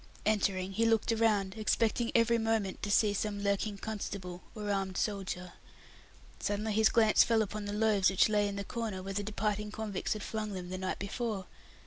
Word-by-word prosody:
Entering, 195 Hz, -3 st, +1 dB
he 225 Hz, +4 st, +2 dB
looked 225 Hz, 0 st, +2 dB
around, 215 Hz, -4 st, +2 dB
expecting 225 Hz, +1 st, +1 dB
every 230 Hz, 0 st, +4 dB
moment 225 Hz, -4 st, 0 dB
to 205 Hz, -, -3 dB
see 205 Hz, 0 st, +4 dB
some 205 Hz, 0 st, -2 dB
lurking 200 Hz, +1 st, 0 dB
constable, 195 Hz, -4 st, -5 dB
or 210 Hz, -1 st, -3 dB
armed 195 Hz, -2 st, -1 dB
soldier. 190 Hz, -3 st, -3 dB, 0.9 s
Suddenly 210 Hz, +1 st, -1 dB
his 220 Hz, +1 st, +5 dB
glance 220 Hz, -2 st, +5 dB
fell 225 Hz, -1 st, +3 dB
upon 210 Hz, 0 st, -5 dB
the 205 Hz, -, -3 dB
food 210 Hz, +2 st, -1 dB
rations 205 Hz, -4 st, +4 dB
which 190 Hz, -, +4 dB
lay 210 Hz, -1 st, +2 dB
in 200 Hz, -, -4 dB
the 200 Hz, -, -3 dB
corner 215 Hz, -4 st, -4 dB
where 195 Hz, +1 st, -5 dB
the 205 Hz, -, -1 dB
departing 210 Hz, 0 st, -2 dB
convicts 210 Hz, -2 st, -3 dB
had 215 Hz, -1 st, -6 dB
flung 215 Hz, -2 st, -3 dB
them 180 Hz, -2 st, -6 dB
the 185 Hz, 0 st, -4 dB
night 185 Hz, 0 st, -2 dB
before. 200 Hz, -1 st, -3 dB
205 Hz, 190 wpm, -32 LUFS, 195-220 Hz, 0.9 s, his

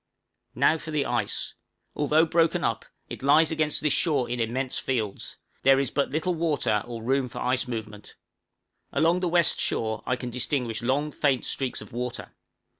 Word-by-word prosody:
Now 160 Hz, -, +3 dB
for 155 Hz, -, -8 dB
the 150 Hz, -2 st, 0 dB
ice. 120 Hz, -4 st, -1 dB, 0.4 s
Although 150 Hz, +2 st, +3 dB
broken 165 Hz, 0 st, +2 dB
up, -, -, -1 dB, 0.2 s
it -, -, -8 dB
lies 150 Hz, +4 st, +4 dB
against 155 Hz, -1 st, +1 dB
this 150 Hz, -3 st, +2 dB
shore 145 Hz, -7 st, +1 dB
in 120 Hz, 0 st, -3 dB
immense 125 Hz, +3 st, -1 dB
fields: 110 Hz, -7 st, -3 dB, 0.2 s
there 135 Hz, 0 st, +5 dB
is 140 Hz, -, -1 dB
but 140 Hz, -, 0 dB
little 160 Hz, +5 st, -1 dB
water 145 Hz, -10 st, 0 dB
or 115 Hz, -2 st, -6 dB
room 130 Hz, +2 st, +1 dB
for 120 Hz, -, -10 dB
ice 125 Hz, +1 st, 0 dB
movement. 110 Hz, -3 st, -7 dB, 0.8 s
Along 165 Hz, +5 st, +2 dB
the 180 Hz, -, -1 dB
west 170 Hz, -1 st, +3 dB
shore 110 Hz, -1 st, 0 dB
I 125 Hz, -, +2 dB
can 125 Hz, 0 st, -6 dB
distinguish 120 Hz, -2 st, -1 dB
long 140 Hz, +5 st, 0 dB
faint 140 Hz, -4 st, +1 dB
streaks 130 Hz, -2 st, -2 dB
of -, -, -12 dB
water. 125 Hz, 0 st, -5 dB
135 Hz, 175 wpm, -26 LUFS, 120-155 Hz, 0.8 s, there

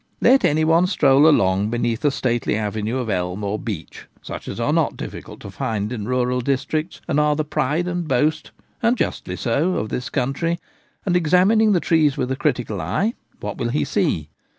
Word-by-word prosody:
Let 270 Hz, +1 st, +5 dB
any 155 Hz, +1 st, +3 dB
one 165 Hz, +3 st, +4 dB
stroll 145 Hz, -5 st, +4 dB
along 100 Hz, -6 st, +2 dB
beneath 120 Hz, -1 st, -1 dB
a 145 Hz, -, +4 dB
stately 120 Hz, -5 st, -1 dB
avenue 110 Hz, +2 st, -2 dB
of 125 Hz, -3 st, -3 dB
elm 90 Hz, 0 st, -2 dB
or 100 Hz, +1 st, -2 dB
beech, 100 Hz, -8 st, -7 dB, 0.2 s
such -, -, -7 dB
as -, -, -5 dB
are -, -, +1 dB
not -, -, +1 dB
difficult -, -, -8 dB
to 100 Hz, -, -8 dB
find 110 Hz, 0 st, -2 dB
in 105 Hz, -3 st, -5 dB
rural 125 Hz, 0 st, 0 dB
districts, 140 Hz, +6 st, -2 dB
and 145 Hz, -, +1 dB
are 150 Hz, 0 st, +3 dB
the 155 Hz, 0 st, -1 dB
pride 150 Hz, +3 st, 0 dB
and 175 Hz, -2 st, -2 dB
boast 150 Hz, +4 st, +1 dB, 0.2 s
— -, -, -40 dB
and 235 Hz, +2 st, +2 dB
justly 90 Hz, -, -2 dB
so 140 Hz, -, 0 dB
— -, -, -2 dB
of 110 Hz, -, -2 dB
this 125 Hz, -, -3 dB
country, 145 Hz, +6 st, -1 dB, 0.5 s
and, 180 Hz, -3 st, +1 dB
examining 185 Hz, +6 st, +4 dB
the 180 Hz, -, +3 dB
trees 155 Hz, -4 st, +2 dB
with 130 Hz, +1 st, -1 dB
critical 120 Hz, -9 st, -1 dB
eye, 220 Hz, +4 st, 0 dB, 0.3 s
what 105 Hz, 0 st, -5 dB
will 120 Hz, -, -1 dB
he 145 Hz, +5 st, 0 dB
see 115 Hz, -, -1 dB
135 Hz, 195 wpm, -21 LUFS, 110-160 Hz, 0.5 s, Let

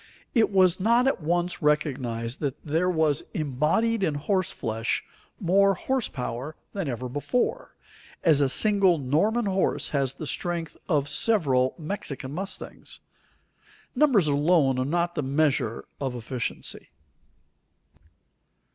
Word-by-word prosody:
It 230 Hz, -3 st, +4 dB
was 185 Hz, -2 st, +4 dB
not 235 Hz, +5 st, +3 dB
at 270 Hz, -, 0 dB
once 175 Hz, +3 st, 0 dB
recognized 130 Hz, -6 st, 0 dB
that 140 Hz, -4 st, -3 dB
there 165 Hz, +4 st, +1 dB
was 160 Hz, -5 st, +2 dB
embodied 160 Hz, -, +1 dB
in 155 Hz, -6 st, +1 dB
horse 185 Hz, +5 st, 0 dB
flesh 115 Hz, +1 st, -2 dB, 0.4 s
more 195 Hz, +1 st, +3 dB
horse 260 Hz, +5 st, -1 dB
power 125 Hz, +4 st, -5 dB, 0.2 s
than 195 Hz, -5 st, -3 dB
ever 125 Hz, 0 st, -4 dB
before, 145 Hz, -, -2 dB, 0.5 s
as 155 Hz, -4 st, +5 dB
a 140 Hz, -, +3 dB
single 200 Hz, +1 st, +4 dB
Norman 165 Hz, -, +1 dB
horse 195 Hz, -1 st, +1 dB
has 135 Hz, -3 st, 0 dB
the 155 Hz, -, -6 dB
strength 170 Hz, +3 st, -3 dB
of 145 Hz, -4 st, +2 dB
several 140 Hz, -, +2 dB
Mexican 150 Hz, -6 st, -5 dB
mustangs. 195 Hz, +5 st, -6 dB, 0.9 s
Numbers 250 Hz, -, +4 dB
alone 145 Hz, -2 st, +3 dB
are 130 Hz, -, 0 dB
not 170 Hz, +4 st, 0 dB
the 150 Hz, -, -2 dB
measure 140 Hz, -5 st, 0 dB
of 135 Hz, -3 st, -3 dB
efficiency. 120 Hz, 0 st, -3 dB
155 Hz, 125 wpm, -26 LUFS, 135-190 Hz, 0.9 s, as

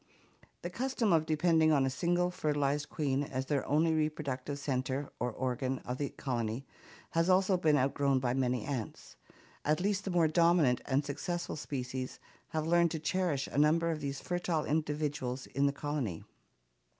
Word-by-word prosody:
The 175 Hz, -, -4 dB
custom 240 Hz, -1 st, 0 dB
of 160 Hz, -1 st, +3 dB
depending 160 Hz, 0 st, +3 dB
on 140 Hz, -3 st, +4 dB
a -, -, +1 dB
single 175 Hz, +5 st, +1 dB
fertilized 145 Hz, -3 st, 0 dB
queen 140 Hz, -3 st, 0 dB
as 130 Hz, -2 st, -3 dB
the 140 Hz, -1 st, 0 dB
only 160 Hz, +3 st, +2 dB
reproductive 150 Hz, -3 st, -2 dB
center 135 Hz, 0 st, -2 dB
or 125 Hz, 0 st, -1 dB
organ 130 Hz, +2 st, -2 dB
of 125 Hz, +1 st, -4 dB
the 140 Hz, -2 st, -1 dB
colony 120 Hz, -1 st, -3 dB, 0.5 s
has 165 Hz, +2 st, +2 dB
also 185 Hz, +1 st, +4 dB
been 155 Hz, -4 st, +3 dB
outgrown 140 Hz, +1 st, +2 dB
by 125 Hz, -1 st, 0 dB
many 125 Hz, -3 st, 0 dB
ants. 130 Hz, -6 st, -5 dB, 0.5 s
At 155 Hz, +1 st, +2 dB
least 200 Hz, +1 st, 0 dB
the -, -, -3 dB
more 175 Hz, -3 st, +3 dB
dominant 165 Hz, -5 st, +4 dB
and 140 Hz, +2 st, +1 dB
successful 170 Hz, +5 st, -3 dB
species 130 Hz, -3 st, -4 dB, 0.3 s
have 155 Hz, -2 st, -2 dB
learned 170 Hz, +1 st, +4 dB
to 160 Hz, -, -3 dB
cherish 160 Hz, -3 st, 0 dB
a -, -, -2 dB
number 165 Hz, +3 st, +3 dB
of 160 Hz, -, -3 dB
these 140 Hz, -1 st, -3 dB
fertile 175 Hz, -3 st, -1 dB
individuals 145 Hz, -4 st, -1 dB
in 140 Hz, +2 st, +1 dB
the -, -, +2 dB
colony. 140 Hz, -, -3 dB
145 Hz, 165 wpm, -32 LUFS, 135-165 Hz, 0.5 s, on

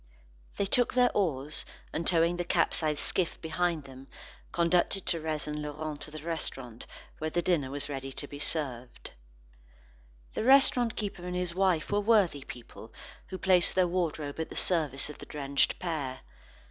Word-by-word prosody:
They 200 Hz, -, +1 dB
took 245 Hz, +5 st, +3 dB
their 250 Hz, -1 st, +5 dB
oars, 150 Hz, -6 st, 0 dB, 0.3 s
and 165 Hz, -, -2 dB
towing 170 Hz, 0 st, +3 dB
the 175 Hz, -, -1 dB
capsized 155 Hz, -3 st, +2 dB
skiff 180 Hz, -3 st, +1 dB
behind 170 Hz, -1 st, -1 dB
them, 135 Hz, 0 st, -12 dB, 0.4 s
conducted 175 Hz, +2 st, +2 dB
Thérèse 160 Hz, -3 st, -1 dB
and 150 Hz, 0 st, -4 dB
Laurent 150 Hz, 0 st, -5 dB
to -, -, -7 dB
the 155 Hz, 0 st, -9 dB
restaurant, 135 Hz, -8 st, -5 dB, 0.3 s
where 155 Hz, -, -1 dB
the 175 Hz, +2 st, 0 dB
dinner 160 Hz, -7 st, +1 dB
was 145 Hz, +1 st, -3 dB
ready 135 Hz, -2 st, -5 dB
to 145 Hz, -, -4 dB
be 145 Hz, -, -9 dB
served. 130 Hz, -6 st, -4 dB, 1.2 s
The -, -, -2 dB
restaurant 250 Hz, -2 st, +5 dB
keeper 200 Hz, -4 st, -4 dB
and 180 Hz, 0 st, -4 dB
his 180 Hz, -1 st, -2 dB
wife 185 Hz, -4 st, +1 dB
were 205 Hz, 0 st, +2 dB
worthy 200 Hz, -10 st, +3 dB
people 115 Hz, -2 st, -11 dB, 0.4 s
who 185 Hz, -, -5 dB
placed 185 Hz, -2 st, +3 dB
their 185 Hz, -1 st, +4 dB
wardrobe 160 Hz, -5 st, -2 dB
at 160 Hz, -, -2 dB
the -, -, -9 dB
service 155 Hz, -6 st, +1 dB
of -, -, -13 dB
the -, -, -10 dB
drenched 140 Hz, -1 st, +1 dB
pair. 150 Hz, -7 st, -3 dB
160 Hz, 165 wpm, -30 LUFS, 145-180 Hz, 1.2 s, their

